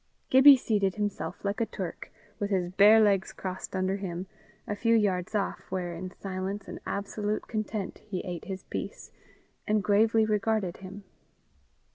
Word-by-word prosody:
Gibbie 270 +1 +9
seated 205 -6 0
himself, 205 -5 -4
like 200 +3 -1
a - - +3
Turk, 180 -4 -6 0.3
with 205 - -1
his 180 -3 0
bare 205 +4 +7
legs 200 -3 +3
crossed 185 0 -6
under 190 +1 0
him, 185 -2 -5 0.4
a 205 - -2
few 230 +2 +2
yards 200 -2 +1
off, 205 - -2
where, 180 -2 -3
in 180 +2 -6
silence 195 +1 -4
and - - -7
absolute 205 +1 -3
content, 215 -2 -3
he 190 -4 -3
ate 180 -1 -6
his 190 -2 -6
piece, - - -6 0.6
and 210 -1 +2
gravely 220 +3 +4
regarded 210 -3 0
him. 195 +1 -10
200 Hz, 155 wpm, -28 LUFS, 185-215 Hz, 0.6 s, Gibbie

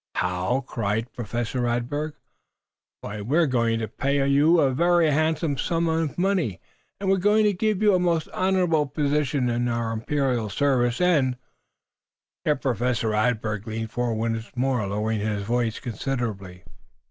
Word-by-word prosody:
"How?" 90 +8 0
cried 115 -1 -3
Professor 120 +2 -3
Radberg. 120 +6 -1 0.9
"Why 105 0 -6
we 130 +10 0
are 170 - +5
going 115 -4 +1
to 110 -1 -3
pay 140 +5 0
you 150 +5 +4
a 135 -3 +3
very 170 +2 +3
handsome 155 -1 0
sum 170 +2 0
of 160 -2 -1
money, 180 - 0 0.4
and 195 - -3
we 190 - +4
are - - -2
going 210 +3 +3
to 210 -1 +3
give 215 +1 0
you 210 -1 +5
a 185 - +3
most 170 -3 +1
honorable 180 -5 +1
position 145 -2 0
in 120 0 0
our 115 -1 -1
imperial 120 -1 -1
service. 120 0 +1
And 145 -9 +2 0.5
" - - -68
Here 150 - +3
Professor 125 -3 -1
Radberg 110 -1 0
leaned 110 0 -4
forward 120 -2 -1 0.2
once 115 0 -5
more, 125 -4 0
lowering 105 +2 -1
his 105 -1 -2
voice 115 +1 -1
considerably. 110 -6 -4
125 Hz, 160 wpm, -25 LUFS, 115-155 Hz, 0.9 s, are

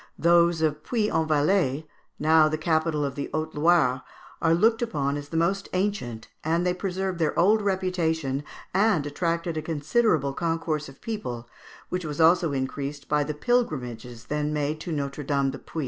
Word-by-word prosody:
Those 170 -1 +4
of 150 -1 0
Puy 220 0 0
en 160 -1 +1
Velay, 155 -1 +2 0.3
now 155 0 +5
the 155 - -1
capital 160 -1 +1
of 140 - -3
the 140 +1 -5
Haute 155 0 -2
Loire, 150 -5 +3 0.4
are 165 0 +4
looked 225 +6 +3
upon 145 -12 -1
as 145 0 -6
the 165 - -3
most 195 +4 0
ancient, 180 - -2 0.2
and 165 +3 +1
they 180 - +2
preserved 185 -1 -3
their 160 -2 0
old 210 +5 +4
reputation 165 -8 -1 0.3
and 195 -5 +3
attracted 165 +2 -2
a - - -1
considerable 155 - +1
concourse 165 -2 -2
of 135 - -16
people, 125 - -5 0.4
which 180 0 -2
was 150 -1 -5
also 165 0 +4
increased 140 +1 -4
by 150 0 +2
the 150 +1 -4
pilgrimages 125 - -2
then 150 0 -1
made 150 +1 -1
to 170 - -6
Notre 140 -1 -3
Dame 140 -1 0
du 135 - -8
Puy. 160 - -7
155 Hz, 175 wpm, -26 LUFS, 145-175 Hz, 0.4 s, now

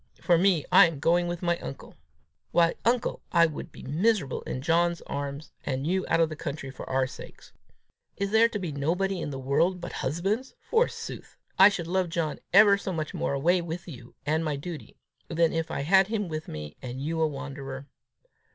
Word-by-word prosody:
For 175 - +3
me, 175 -3 +3
I - - +8
am 165 -3 -5
going 175 +4 +2
with 175 +1 -4
my 175 0 +1
uncle. 135 - -9 0.5
Why, 170 -1 +3
uncle, 240 +1 +1
I 170 -1 +6
should 155 -3 -5
be - - -12
miserable 165 - 0
in 130 - -4
John's 170 +1 +2
very - - -4
arms 140 +1 -5
and 135 0 -2
you 185 +3 0
out - - +2
of 165 -1 +3
the 155 - -6
country 140 -3 -5
for 130 - -9
our 130 0 +2
sakes! 130 - -11 0.6
Is 200 0 -2
there 225 +1 +5
to 215 - -3
be 180 -5 -4
nobody 175 +6 -1
in - - -3
the 135 - -5
world 140 +8 +1
but 175 - -6
husbands, 195 - -2 0.2
forsooth! 475 +1 -1 0.2
I 195 +2 +10
should 175 -5 -4
love 180 +1 0
John 165 -2 -2
ever 200 0 +7
so 195 - -4
much 155 -3 -3
more - - -1
away 170 +6 +2
with 170 +1 -6
you 125 -7 -11
and 155 +2 +1
my 155 -2 -1
duty, 155 +3 -8 0.3
than 165 -1 +2
if 165 0 -1
I 140 - -3
had 190 +6 +4
him 210 -2 -2
with 155 -1 -5
me, 75 -1 -7
and 125 0 -6
you 160 +4 -2
a 160 - +4
wanderer. 140 -1 -7
165 Hz, 205 wpm, -27 LUFS, 140-185 Hz, 0.6 s, I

